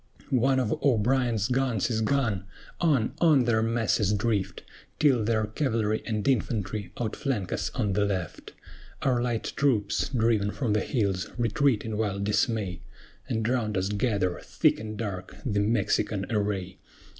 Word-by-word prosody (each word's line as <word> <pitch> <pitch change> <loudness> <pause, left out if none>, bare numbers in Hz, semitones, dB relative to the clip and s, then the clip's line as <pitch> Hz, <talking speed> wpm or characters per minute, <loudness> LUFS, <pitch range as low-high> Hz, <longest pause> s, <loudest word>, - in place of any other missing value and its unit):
One 130 +1 +3
of 130 - 0
O'Brien's 120 -3 +2
guns 125 -4 0
is 110 -1 0
gone! 110 -6 0 0.3
On, 140 -10 +2
on 150 -7 +5
their 110 -2 +2
masses 115 -3 +1
drift, 105 -1 -1 0.3
Till 130 -7 +3
their 110 0 +1
cavalry 110 -2 -1
and 110 0 -2
infantry 105 -6 -1
outflank 110 -3 -2
us - - -1
on 105 -6 0
the 105 +2 +2
left; 95 -4 -3 0.5
Our 125 -3 +2
light 120 -2 -2
troops, 120 -8 +1
driven 115 -5 +2
from 110 0 -1
the 105 - +3
hills, 100 -7 -1
retreat 120 0 +1
in 110 -1 -3
wild 100 -2 -1
dismay, 105 -4 0 0.5
And 110 0 0
round 115 -5 0
us 95 +1 0
gather, 100 -4 0
thick - - +2
and 110 0 -6
dark, 95 -4 -5
the 105 -5 0
Mexican 105 -1 +1
array. 100 -4 -2
110 Hz, 145 wpm, -27 LUFS, 100-120 Hz, 0.5 s, on